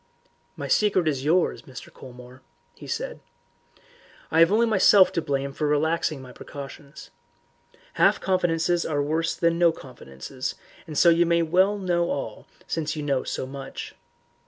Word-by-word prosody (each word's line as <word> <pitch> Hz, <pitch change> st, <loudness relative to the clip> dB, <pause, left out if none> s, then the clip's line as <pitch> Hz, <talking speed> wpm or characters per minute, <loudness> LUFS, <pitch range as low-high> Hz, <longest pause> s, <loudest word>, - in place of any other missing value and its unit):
"My -, -, -5 dB
secret 195 Hz, -5 st, +2 dB
is 135 Hz, -4 st, -1 dB
yours, 165 Hz, +4 st, +1 dB
Mr. 130 Hz, -2 st, -12 dB
Colmore," 125 Hz, 0 st, -13 dB, 0.5 s
said -, -, -4 dB, 0.6 s
he. -, -, -30 dB, 0.5 s
"I -, -, +5 dB
have 165 Hz, +2 st, +6 dB
only 225 Hz, +3 st, +4 dB
myself 200 Hz, -3 st, +5 dB
to 165 Hz, -, -1 dB
blame 140 Hz, -2 st, -2 dB
for 150 Hz, +2 st, -2 dB
relaxing 155 Hz, -1 st, 0 dB
my 125 Hz, -, -11 dB
precautions. 140 Hz, +1 st, -11 dB, 0.8 s
Half -, -, +3 dB
confidences 175 Hz, -2 st, +1 dB
are 145 Hz, -2 st, -1 dB
worse 160 Hz, +3 st, -1 dB
than 170 Hz, 0 st, +1 dB
no 170 Hz, -1 st, +5 dB
confidences, 130 Hz, -, -8 dB, 0.3 s
and 155 Hz, -2 st, -6 dB
so 170 Hz, -, +6 dB
you 170 Hz, 0 st, +4 dB
may 170 Hz, 0 st, +3 dB
know 180 Hz, 0 st, +1 dB
all 110 Hz, -6 st, -5 dB, 0.2 s
since 155 Hz, -1 st, -3 dB
you 150 Hz, -, -4 dB
know 140 Hz, -3 st, 0 dB
so -, -, -4 dB
much. 135 Hz, 0 st, -8 dB
160 Hz, 150 wpm, -25 LUFS, 140-175 Hz, 0.8 s, have